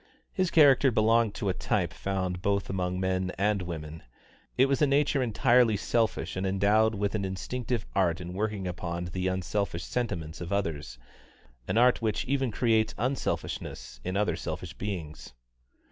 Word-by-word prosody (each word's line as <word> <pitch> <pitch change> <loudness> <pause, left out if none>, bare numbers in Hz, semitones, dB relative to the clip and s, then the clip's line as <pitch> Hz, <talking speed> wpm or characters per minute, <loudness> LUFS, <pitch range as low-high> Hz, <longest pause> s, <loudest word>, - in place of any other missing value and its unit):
His 185 -2 +1
character 145 -4 +6
belonged 115 -1 +3
to 100 - -2
a - - +1
type - - -1
found 95 -2 -2
both 100 0 0
among 90 -1 -2
men 95 0 0
and 100 +1 +1
women; 80 -3 -6 0.6
it 130 - +6
was 135 +1 0
a 150 - +5
nature 140 0 +2
entirely 120 -1 +3
selfish 115 +2 0
and 95 - -2
endowed 105 +3 +3
with 100 0 -1
an 105 -2 -1
instinctive 115 +5 -3
art 90 -3 +2
in 90 0 -6
working 105 -1 -2
upon 85 -1 -4
the 90 +2 -2
unselfish 95 -1 -2
sentiments 85 -11 -3
of 85 +1 -5
others 75 -10 -2 0.7
an - - 0
art 125 +1 +4
which 110 +1 -1
even 135 -1 0
creates 110 0 +1
unselfishness 120 - -3
in 95 +2 -2
other 105 0 +1
selfish - - -5
beings. 85 -9 -6
100 Hz, 160 wpm, -28 LUFS, 90-115 Hz, 0.7 s, character